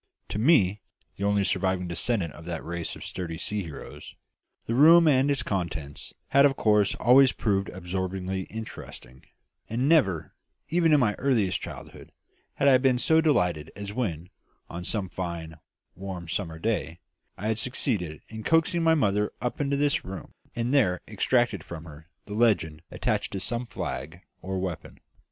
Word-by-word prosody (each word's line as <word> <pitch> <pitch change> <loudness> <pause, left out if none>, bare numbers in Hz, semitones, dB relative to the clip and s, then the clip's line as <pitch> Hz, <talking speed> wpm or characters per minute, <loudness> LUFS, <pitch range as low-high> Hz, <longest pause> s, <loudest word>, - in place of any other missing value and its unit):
To 105 - -3
me, 105 - +4 0.4
the 100 - -4
only 100 0 +2
surviving 95 -2 0
descendant 85 -1 -1
of 80 - -12
that 85 -2 -5
race 85 0 -3
of - - -9
sturdy 85 -3 -5
sea 105 +4 -2
heroes, 80 -6 -9 0.5
the 115 - -2
room 165 +6 +7
and 135 -1 +4
its 140 -4 +1
contents 85 -8 -4 0.2
had 140 +1 +5
of 140 -1 +4
course 105 -3 +3
always 130 +1 +5
proved 100 -3 0
absorbingly 95 +1 -3
interesting; 110 - -9 0.5
and 120 +4 0
never, 95 - +2 0.4
even 170 -1 +3
in 150 - +6
my 110 -5 +2
earliest 115 -9 +1
childhood, - - -9 0.4
had 140 - +2
I 130 -2 +7
been 130 -1 +3
so 160 +6 +4
delighted 90 - +1
as 100 0 -6
when, 90 -7 -3 0.4
on 85 +1 -5
some 100 +1 -1
fine, 85 -3 -6 0.3
warm, 95 -2 -7
summer 80 -1 -3
day, 85 -4 -2 0.4
I 105 +4 -2
had 110 0 0
succeeded 105 - -2
in 110 0 -8
coaxing 165 +4 +2
my 165 0 +4
mother 105 -7 +1
up 125 +4 -3
into 140 0 0
this 145 0 +1
room 95 0 -8 0.2
and 120 +3 -1
there 95 -11 +3
extracted 110 -3 +1
from 80 -2 -8
her 80 +1 -12 0.2
the 105 - -7
legend 100 -9 +2
attached - - -1
to 95 - -2
some 120 +5 -3
flag 85 -5 -5 0.2
or 95 0 -3
weapon. 95 -3 -5
100 Hz, 165 wpm, -27 LUFS, 85-125 Hz, 0.5 s, room